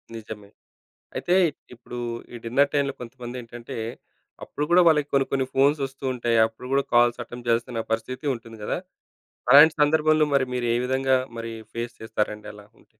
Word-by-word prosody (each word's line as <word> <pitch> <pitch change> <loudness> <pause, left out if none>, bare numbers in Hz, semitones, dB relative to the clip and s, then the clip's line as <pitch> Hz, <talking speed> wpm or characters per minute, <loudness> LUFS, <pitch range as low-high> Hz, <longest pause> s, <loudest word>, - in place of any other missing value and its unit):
నిజమే. 105 -2 -9 0.7
అయితే 175 - +1 0.4
ఇప్పుడు 120 +1 -10 0.4
ఈ - - -6
డిన్నర్ 140 +5 +2
టైమ్‌లో 140 -1 +1
కొంతమందేంటంటే, 120 -1 -8 0.7
అప్పుడు 150 - -3
కూడా 180 +1 +7
వాళ్ళకి 150 -3 +4
కొన్ని 135 -1 +3
కొన్ని 135 -1 +1
ఫోన్స్ 140 +3 +3
వస్తూ 135 +1 -12
ఉంటాయి. 120 -2 0
అప్పుడు 115 +3 -12
కూడా 140 0 +3
కాల్స్ 120 0 +4
అటెంప్ట్ 120 +1 -10
జేయాల్సిన 115 0 0
పరిస్థితి 120 +5 -3
ఉంటుంది 115 -1 -12
గదా! - - -2 0.7
అలాంటి 150 +4 +9
సందర్భంలో 155 +1 +4
మరి 135 - +4
మీరు 125 -1 -1
ఏ - - +2
విధంగా 130 +1 +2 0.2
మరి 115 0 -5 0.2
ఫేస్ 120 +1 -4
చేస్తారండి 105 -1 -3
అలా 105 0 -14
ఉంటే? - - -25
125 Hz, 155 wpm, -25 LUFS, 115-140 Hz, 0.7 s, అలాంటి